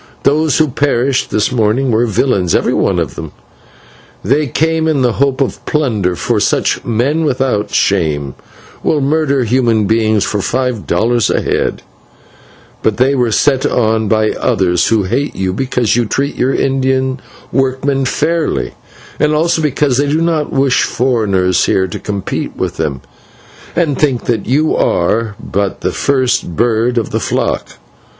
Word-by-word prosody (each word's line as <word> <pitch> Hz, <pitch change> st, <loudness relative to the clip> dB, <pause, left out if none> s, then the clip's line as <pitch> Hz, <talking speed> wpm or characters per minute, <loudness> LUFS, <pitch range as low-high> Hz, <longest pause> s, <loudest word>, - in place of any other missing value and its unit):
Those 155 Hz, +1 st, +2 dB
who 155 Hz, -, +3 dB
perished 135 Hz, -1 st, 0 dB
this 105 Hz, +2 st, 0 dB
morning 125 Hz, +2 st, +1 dB
were 115 Hz, +2 st, +2 dB
villains, 100 Hz, -5 st, +1 dB
every -, -, +1 dB
one -, -, +1 dB
of -, -, -2 dB
them. -, -, -8 dB, 0.9 s
They 140 Hz, +8 st, +1 dB
came 160 Hz, +4 st, 0 dB
in 145 Hz, -5 st, +1 dB
the 125 Hz, -, +3 dB
hope 140 Hz, +1 st, 0 dB
of 135 Hz, -, -2 dB
plunder, 110 Hz, -12 st, 0 dB
for -, -, 0 dB
such -, -, 0 dB
'men 130 Hz, +8 st, 0 dB
without 130 Hz, -7 st, 0 dB
shame' 75 Hz, -4 st, 0 dB, 0.5 s
will 155 Hz, -, +1 dB
murder 140 Hz, -1 st, +1 dB
human 115 Hz, -2 st, +1 dB
beings 110 Hz, -1 st, +2 dB
for 105 Hz, -, -1 dB
five 125 Hz, -1 st, -2 dB
dollars 120 Hz, -1 st, +1 dB
a -, -, +1 dB
head; -, -, -1 dB, 1.0 s
but 110 Hz, -2 st, 0 dB
they 130 Hz, +3 st, +3 dB
were 125 Hz, -4 st, +1 dB
set 135 Hz, +5 st, +2 dB
on 110 Hz, -2 st, +1 dB
by 110 Hz, +1 st, +2 dB
others 95 Hz, -8 st, +1 dB
who 110 Hz, -3 st, +2 dB
hate 130 Hz, +10 st, -2 dB
you 95 Hz, -1 st, -2 dB
because 125 Hz, -1 st, 0 dB
you 120 Hz, -1 st, +1 dB
treat 140 Hz, +5 st, -1 dB
your 130 Hz, +2 st, +1 dB
Indian 130 Hz, 0 st, 0 dB, 0.3 s
workmen 135 Hz, +1 st, 0 dB
fairly, 160 Hz, +4 st, -1 dB, 0.5 s
and 150 Hz, 0 st, +2 dB
also 165 Hz, +1 st, +1 dB
because 145 Hz, -3 st, +1 dB
they 145 Hz, -, +2 dB
do 150 Hz, +3 st, +1 dB
not 165 Hz, -3 st, 0 dB
wish 135 Hz, -1 st, +2 dB
foreigners 100 Hz, -8 st, +1 dB
here 95 Hz, -, +2 dB
to 90 Hz, -, -6 dB
compete 100 Hz, -2 st, -4 dB
with -, -, -3 dB
them, 70 Hz, -3 st, -2 dB, 0.7 s
and 160 Hz, -6 st, 0 dB
think 135 Hz, -5 st, +1 dB
that 115 Hz, -4 st, -1 dB
you 150 Hz, +6 st, +2 dB
are 105 Hz, +5 st, 0 dB
but 100 Hz, -1 st, -3 dB
the -, -, -1 dB
first 130 Hz, -10 st, 0 dB
bird 120 Hz, +2 st, +1 dB
of 115 Hz, -, -1 dB
the -, -, 0 dB
flock. -, -, -2 dB
125 Hz, 155 wpm, -14 LUFS, 110-140 Hz, 1.0 s, who